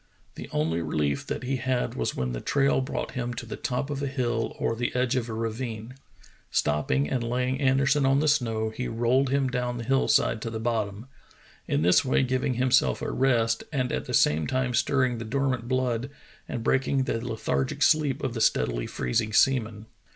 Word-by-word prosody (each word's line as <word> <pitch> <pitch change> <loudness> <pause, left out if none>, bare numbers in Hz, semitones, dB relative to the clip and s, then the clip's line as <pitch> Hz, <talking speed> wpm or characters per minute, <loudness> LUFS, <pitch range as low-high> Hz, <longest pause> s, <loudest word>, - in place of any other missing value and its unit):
The - - -9
only 80 +2 0
relief 75 -3 -1
that - - -4
he 130 +1 -1
had 130 0 -1
was 60 - -2
when 65 -1 -2
the - - -4
trail 140 -1 +2
brought 130 - -4
him 120 -2 -3
to 120 0 -6
the 115 - -6
top 130 +3 -3
of 140 -1 -3
a 140 - -1
hill 120 -4 -2
or 115 - -1
the 120 +2 -2
edge 125 0 +1
of 120 -2 -1
a - - -4
ravine. 115 +1 -4 0.6
Stopping 75 -2 +1
and 120 - -1
lay 125 +2 -1
ing 130 +2 -2
Anderson 135 +1 +3
on 135 +1 +3
the 155 - +1
snow, 115 -7 +1
he 125 +3 -4
rolled 120 +4 +1
him 135 0 +1
down 125 -1 -2
the 120 - -5
hill 135 +3 +1
side 140 -6 +2
to 115 - -3
the 110 -1 -4
bottom, 110 -2 -2 0.6
in 75 - +1
this 90 +1 +5
way 135 0 +2
giving 130 0 0
himself 130 +1 +2
a - - -2
rest 115 -4 +1
and 130 -4 -1
at - - -2
the - - -6
same 75 +1 +3
time 130 -1 -1
stirring 125 -1 +1
the - - -4
dormant 130 0 -1
blood 130 0 -1 0.4
and 120 -3 -4
break 135 +2 +1
ing 135 -1 +1
the 115 -2 -2
lethargic 110 - -1
sleep 150 -4 +2
of 130 - -1
the 115 - -3
steadily - - +1
freezing 105 - -1
seaman. 110 -3 +2
120 Hz, 205 wpm, -26 LUFS, 110-130 Hz, 0.6 s, this